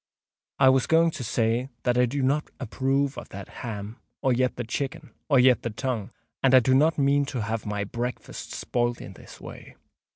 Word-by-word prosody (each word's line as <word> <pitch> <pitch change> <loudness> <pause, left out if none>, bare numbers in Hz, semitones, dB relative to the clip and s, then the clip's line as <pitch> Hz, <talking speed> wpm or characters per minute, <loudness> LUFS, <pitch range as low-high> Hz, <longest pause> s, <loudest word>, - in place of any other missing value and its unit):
I 130 - +6
was 130 -1 +3
going 165 +1 +4
to 155 -5 -6
say 115 +3 0
that 125 - +2
I 125 0 +4
do 135 +3 -2
not 145 +3 +1
approve 135 +3 -1
of - - -12
that 100 0 -8
ham—or 115 +4 -4
yet 125 +1 +1
the 120 - -4
chicken—or 140 +2 -3
yet 125 0 +5
the 120 - -3
tongue; 115 -2 -3 0.3
and 135 -1 +5
I - - +9
do 130 +1 +2
not 155 +5 +4
mean 140 0 +3
to 130 -5 -3
have 110 0 -3
my 105 -1 -2
breakfast 120 +4 -5
spoilt 120 0 -1
in 95 - -9
this - - -14
way. - - -11
125 Hz, 190 wpm, -26 LUFS, 115-135 Hz, 0.3 s, I